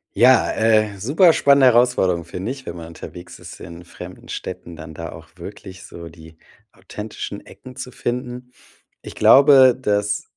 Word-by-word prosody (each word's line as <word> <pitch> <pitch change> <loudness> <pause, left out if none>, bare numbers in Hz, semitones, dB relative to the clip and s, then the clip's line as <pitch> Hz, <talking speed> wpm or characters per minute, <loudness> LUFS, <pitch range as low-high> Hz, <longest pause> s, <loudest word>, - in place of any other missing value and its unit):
Ja, 125 0 +4
äh, 110 -2 +1
super 160 - +3
spannende 140 -3 +4
Herausforderung 115 -8 +2
finde 95 +8 -6
ich, 135 -1 -9
wenn 85 - -7
man 85 -1 -9
unterwegs 85 +1 -11
ist - - -13
in 85 +1 -11
fremden 90 +1 -12
Städten, 85 -1 -8
dann 80 0 -11
da 80 0 -7
auch 80 -1 -13
wirklich 95 +1 -11
so 85 -3 -11
die 80 0 -16 0.4
authentischen - - -9
Ecken 130 -1 -14
zu 130 -1 -8
finden. 125 +1 -6 0.5
Ich - - -10
glaube, 135 -2 +6
das 105 -3 -1
105 Hz, 155 wpm, -20 LUFS, 85-125 Hz, 0.5 s, glaube